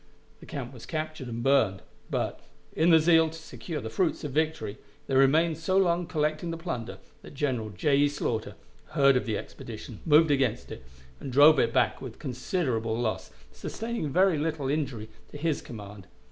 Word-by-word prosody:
The - - -14
camp 135 -2 -6
was 120 - -11
captured 155 -4 -4
and 120 0 -4
burned, 125 -8 +2 0.3
but, - - -2 0.4
in 165 +2 +3
the 165 -1 +7
zeal 160 0 +5
to 160 - -10
secure 160 0 -6
the 110 -4 -6
fruits 175 - 0
of 145 - -4
victory, 150 -8 -1 0.3
they - - -4
remained 155 +4 +4
so 185 +4 +1
long 175 -2 +2
collecting 155 0 -1
the 165 - -3
plunder, 125 - -5 0.2
that - - -13
General 130 -6 -1
J. 140 +9 +1
E. 145 0 +4
Slaughter 120 -6 -3 0.4
heard 140 -1 +5
of 125 - 0
the 110 -2 0
expedition, - - -9
moved 155 0 +5
against 130 -4 0
it, 65 - -8 0.4
and 135 - -6
drove 145 +4 +7
it - - +2
back - - +1
with - - -8
considerable 125 -4 -2
loss, 115 -3 -2 0.2
sustaining 220 - -4
very 180 +1 +3
little 150 -3 -2
injury 135 -7 -2 0.2
to - - -9
his 155 0 -1
command. 100 -4 -10
145 Hz, 180 wpm, -28 LUFS, 120-160 Hz, 0.4 s, the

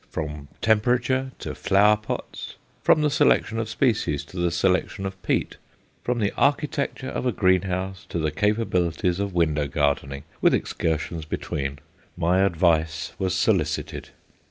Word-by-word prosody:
From 75 -2 -5 0.2
temperature 125 +4 +2
to - - -5
flower 105 +2 +4
pots, 105 0 -6 0.3
from 155 - +4
the 150 - +2
selection 115 -5 +3
of 110 -1 -3
species 110 - 0
to 90 - -12
the 85 0 +1
selection 90 +3 0
of 95 0 -6
peat, - - -1 0.5
from 125 0 0
the 105 -3 0
architecture 140 -2 0
of 130 - -2
a - - +2
greenhouse 95 0 0
to - - -3
the 80 -2 0
capabilities 90 -2 0
of 100 -2 -2
window 75 -4 +2
gardening, 70 -1 -1 0.2
with - - +5
excursions 80 0 -2
between, 70 -2 -3 0.4
my 90 +2 +2
advice 80 -4 +1
was 95 -2 0
solicited. - - 0
95 Hz, 140 wpm, -24 LUFS, 80-110 Hz, 0.5 s, with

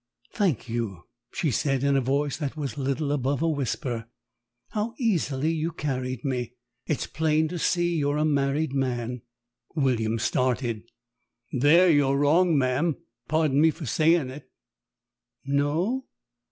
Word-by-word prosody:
"Thank 180 - 0
you," 115 -7 -3 0.3
she 155 - -1
said 135 +2 0
in 140 0 +3
a 135 - +3
voice 140 +3 0
that 150 -1 -4
was 145 -3 -3
little 140 +1 -1
above 140 +1 0
a - - +2
whisper. 125 -5 -2 0.6
"How 220 +2 -3
easily 160 - 0
you 165 +1 -1
carried 130 -5 -3
me. 125 -3 -2 0.3
It's 155 - -1
plain 155 0 +1
to 175 - -4
see 175 +1 +1
you're 145 -1 +1
a 150 - +2
married 140 0 +1
man." 125 -3 -2 0.5
William 115 -6 +1
started. 120 -1 0 0.7
"There 150 +8 +5
you're 145 -4 +4
wrong, 160 +3 +4
ma'am, 135 +4 +1 0.3
pardon 155 -3 +2
me 160 - +6
for 160 0 -5
sayin' 155 0 +2
it." 140 +2 -11 1.0
"No? 155 - 0
145 Hz, 140 wpm, -26 LUFS, 130-160 Hz, 1.0 s, me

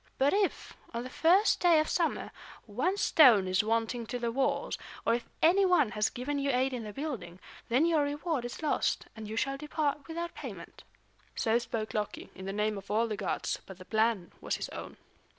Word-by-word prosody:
But 275 +2 +3
if, 400 -1 0 0.2
on 235 - -2
the 255 - -8
first 370 +6 +4
day 345 -3 +5
of 310 - +1
summer, 335 -2 -1 0.3
one 265 - -1
stone 245 - +6
is 185 +2 +2
wanting 230 +1 -1
to 245 - -3
the 235 -1 -2
walls, 265 +3 0 0.3
or 230 - +3
if 235 - -3
any 365 +5 +6
one 355 - +4
has 210 0 +1
given 285 +4 -3
you 280 0 0
aid 260 0 +1
in 245 -2 -4
the 210 - -6
building, 255 - -5 0.3
then 255 +7 +4
your 330 -3 +3
reward 290 -1 -1
is 240 +6 -6
lost, 305 - 0
and 220 -1 -7
you 215 - -5
shall 275 +4 0
depart 295 -1 -2
without 340 +1 -4
payment." - - -9 0.5
So 225 0 +2
spoke 225 -2 -4
Loki, 210 -1 -4
in 190 - -9
the 195 - -3
name 210 0 -1
of 195 - -16
all 220 +3 +2
the 215 - -2
gods; - - -2
but 190 - -10
the 185 - -12
plan 220 -4 +1
was - - -1
his - - -5
own. - - -8
250 Hz, 205 wpm, -30 LUFS, 220-310 Hz, 0.5 s, stone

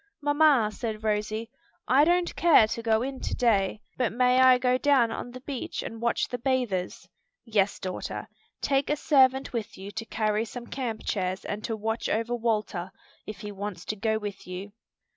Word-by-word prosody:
"Mamma," 290 -6 +4
said 220 -1 -4
Rosie, 215 +1 -1 0.4
"I 275 +4 +5
don't 350 +1 +2
care 330 -10 +6
to 225 +2 -4
go 225 0 +2
in 265 0 -4
to - - -3
day, 210 -3 +1 0.2
but 245 -5 +1
may 250 +2 +3
I 260 -1 +7
go 250 0 +2
down 265 -6 +3
on 240 - -5
the 255 +1 -10
beach 265 -2 -5
and 225 0 -7
watch 235 0 +1
the 245 - -5
bathers?" 240 -8 -1 0.4
"Yes, 205 -3 +1
daughter. 185 -1 -5 0.3
Take 275 -1 +1
a 295 - +2
servant 265 -3 +3
with 230 -3 -4
you 195 +2 -8
to 225 +2 -5
carry 215 -1 0
some 240 +1 -8
camp 235 -4 -4
chairs 185 -2 -2
and 210 +1 -4
to 225 -2 -2
watch 225 +2 -2
over 230 +2 0
Walter, 215 -6 -1 0.4
if 210 -3 -7
he 210 - -6
wants 200 -3 -6
to 215 - -3
go 220 +1 0
with 205 -4 -7
you." 185 +3 -6
225 Hz, 185 wpm, -27 LUFS, 210-255 Hz, 0.4 s, I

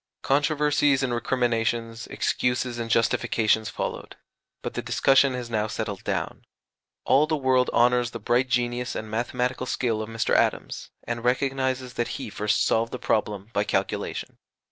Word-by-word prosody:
Controversies 145 -1 +2
and 125 -2 0
recriminations, 115 -2 -1
excuses 125 -1 -1
and 115 -1 -4
justifications, 110 -1 +2
followed; - - -5 0.5
but - - -4
the - - -3
discussion 135 -1 +3
has 125 -1 -4
now 110 -2 -1
settled 105 -3 -4
down. - - -3 0.6
All 145 +3 +4
the 155 -1 0
world 130 -2 +2
honours 125 0 +3
the 115 - -6
bright 120 +4 +1
genius 125 0 -1
and 110 0 -5
mathematical 125 +2 -1
skill 115 -4 0
of 110 - -5
Mr. 115 0 -1
Adams, - - 0
and 115 -1 -4
recognizes 130 0 0
that 120 - -2
he 135 -6 -6
first 105 0 +1
solved 115 +1 +1
the - - -4
problem 105 -2 -1
by 100 - +2
calculation. 105 - -3
120 Hz, 150 wpm, -25 LUFS, 115-130 Hz, 0.6 s, All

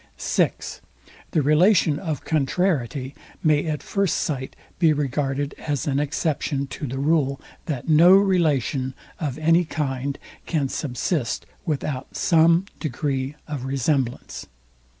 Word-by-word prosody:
(6) - - -1 0.5
The 155 - +1
relation 155 +1 +4
of 160 -6 -4
CONTRARIETY 140 -4 0 0.3
may 155 0 +3
at 150 -2 -2
first 200 -3 0
sight 130 -4 -3 0.2
be 165 -3 +5
regarded 145 0 -1
as 145 -3 -2
an 140 -1 +1
exception 145 -1 -1
to 140 +2 -6
the 130 +2 -4
rule, 140 -1 +1 0.3
THAT 140 -7 -3
NO 165 +3 +7
RELATION 150 - +2 0.2
OF 145 -6 -3
ANY 165 +3 +4
KIND 140 -3 -2 0.3
CAN 145 -5 0
SUBSIST 130 0 -2 0.2
WITHOUT 145 -3 -3
SOME 165 +2 +4
DEGREE 140 -1 -2
OF 145 -4 -4
RESEMBLANCE. 135 -1 -1
145 Hz, 120 wpm, -23 LUFS, 135-160 Hz, 0.5 s, NO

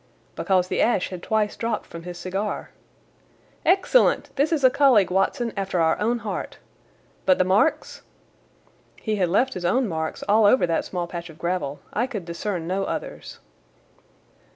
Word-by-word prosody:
"Because 185 -2 +1
the - - 0
ash 225 -6 +2
had 185 -2 -7
twice 215 0 0
dropped 230 -2 -2
from 170 - -9
his 175 0 -8
cigar." 195 +4 -4 0.9
"Excellent! 390 - +3
This 285 +3 +1
is 310 -4 0
a 260 - +7
colleague, 245 -10 +4
Watson, 205 +5 0
after 195 -3 -2
our 160 0 +2
own 230 +3 +1
heart. 205 - -4 0.7
But 185 - +5
the - - +3
marks?" 195 - +1 1.0
"He 215 -2 -2
had 180 -3 +1
left 255 +8 +2
his 180 - -6
own 235 +8 +2
marks 160 -3 -4
all 210 +1 +4
over 255 -1 +4
that 165 -1 -1
small 175 -2 -3
patch 170 0 -7
of 160 - -13
gravel. 170 -5 -3
I 240 +4 0
could 210 -10 -6
discern 170 +1 -4
no 190 +3 -1
others." - - -6
195 Hz, 165 wpm, -24 LUFS, 175-230 Hz, 1.0 s, a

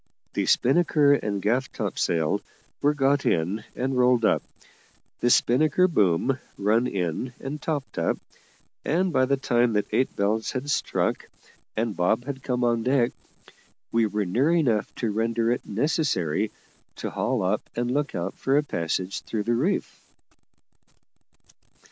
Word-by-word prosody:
The - - -1
spinnaker 145 +1 +4
and 105 -7 -1
gaff 125 +5 +1
topsail 85 -6 -1 0.4
were 145 +1 +3
got 140 0 +2
in 90 +7 0
and 130 +1 -1
rolled 125 -2 +4
up, - - +3 0.8
the 120 - +2
spinnaker 155 +10 +4
boom 120 - +2 0.2
run 110 +5 +2
in 95 +5 -2
and 145 +2 -6
topped 145 -5 -3
up, - - +1 0.7
and 175 +3 +1
by 130 - +4
the 140 +1 +1
time 120 -3 +2
that 105 -1 +1
eight 130 - +1
bells 105 +2 0
had 140 +2 -3
struck, - - -1 0.5
and 110 -2 -1
Bob 110 +7 +1
had 135 -1 -5
come 125 -2 -1
on 120 -1 +2
deck, 125 0 +2 0.8
we 115 -1 +3
were 105 0 -1
near 120 - +1
enough 125 -11 +1
to 115 -3 -1
render 115 +2 0
it 120 - -2
necessary 120 - 0 0.5
to - - -5
haul - - -1
up - - -1
and 120 +1 -1
look 145 -2 -1
out 90 +2 -2
for 135 +1 +1
a 150 - +3
passage 90 - -2
through 110 -2 -3
the 120 - 0
reef. 150 +12 -1
120 Hz, 150 wpm, -25 LUFS, 105-140 Hz, 0.8 s, spinnaker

